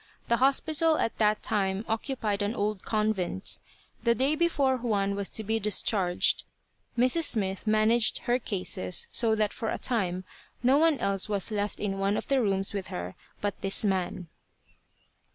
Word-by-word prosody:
The 235 Hz, -, +3 dB
hospital 310 Hz, +4 st, +2 dB
at 230 Hz, -, -2 dB
that 210 Hz, -1 st, +2 dB
time 195 Hz, 0 st, -1 dB
occupied 225 Hz, -3 st, -2 dB
an 205 Hz, +3 st, -1 dB
old 205 Hz, -1 st, -2 dB
convent. 210 Hz, -, -1 dB, 0.4 s
The 235 Hz, 0 st, +2 dB
day 270 Hz, +4 st, +2 dB
before 295 Hz, -5 st, +2 dB
Juan 205 Hz, -5 st, 0 dB
was 200 Hz, -1 st, -1 dB
to 220 Hz, -, -2 dB
be 220 Hz, +2 st, 0 dB
discharged, 195 Hz, -3 st, +2 dB, 0.5 s
Mrs. 255 Hz, +7 st, +3 dB
Smith 195 Hz, -5 st, 0 dB
managed 215 Hz, +2 st, +3 dB
her 245 Hz, +1 st, +1 dB
cases 185 Hz, -4 st, -1 dB
so 225 Hz, -2 st, +2 dB
that 215 Hz, -1 st, 0 dB
for 225 Hz, -, -3 dB
a -, -, -2 dB
time 185 Hz, -7 st, -1 dB, 0.4 s
no 265 Hz, +4 st, +5 dB
one 320 Hz, -2 st, +4 dB
else 195 Hz, -3 st, 0 dB
was 205 Hz, +1 st, -1 dB
left 205 Hz, -1 st, -2 dB
in 195 Hz, -2 st, -2 dB
one 195 Hz, +1 st, +1 dB
of -, -, -5 dB
the 275 Hz, -2 st, +3 dB
rooms 195 Hz, -3 st, 0 dB
with 200 Hz, -2 st, -4 dB
her 90 Hz, +1 st, -5 dB, 0.3 s
but 205 Hz, 0 st, -3 dB
this 195 Hz, +2 st, 0 dB
man. 185 Hz, -2 st, -1 dB
215 Hz, 165 wpm, -28 LUFS, 195-240 Hz, 0.5 s, no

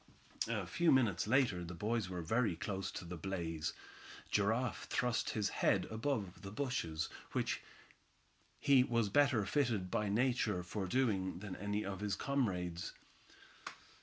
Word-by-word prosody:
A 110 Hz, -4 st, -1 dB
few 165 Hz, -, +3 dB
minutes 110 Hz, -8 st, +3 dB
later, 120 Hz, -5 st, +3 dB
and 85 Hz, -, -5 dB
the 90 Hz, -, -6 dB
boys 105 Hz, +2 st, -1 dB
were 90 Hz, -2 st, -4 dB
very 110 Hz, +2 st, +1 dB
close 95 Hz, +3 st, -3 dB
to -, -, -5 dB
the 85 Hz, +1 st, -6 dB
blaze. 80 Hz, -3 st, -2 dB, 0.6 s
Giraffe 110 Hz, +5 st, +1 dB
thrust 125 Hz, -2 st, 0 dB
up -, -, -1 dB
his 105 Hz, -2 st, +1 dB
head -, -, +2 dB
above 110 Hz, -5 st, -2 dB
the 95 Hz, -, -6 dB
bushes, 100 Hz, -, -2 dB, 0.3 s
which -, -, 0 dB, 1.0 s
he 135 Hz, -3 st, +6 dB
was 115 Hz, -4 st, +1 dB
better 135 Hz, -3 st, +4 dB
fitted 110 Hz, -6 st, +1 dB
by 105 Hz, -1 st, +1 dB
Nature 110 Hz, -4 st, +1 dB
for 95 Hz, +2 st, -3 dB
doing 95 Hz, -6 st, +1 dB
than 95 Hz, 0 st, -6 dB
any 105 Hz, +2 st, -2 dB
of 95 Hz, -1 st, -4 dB
his 105 Hz, -1 st, -1 dB
comrades. 90 Hz, -, -1 dB
105 Hz, 150 wpm, -36 LUFS, 90-120 Hz, 1.0 s, he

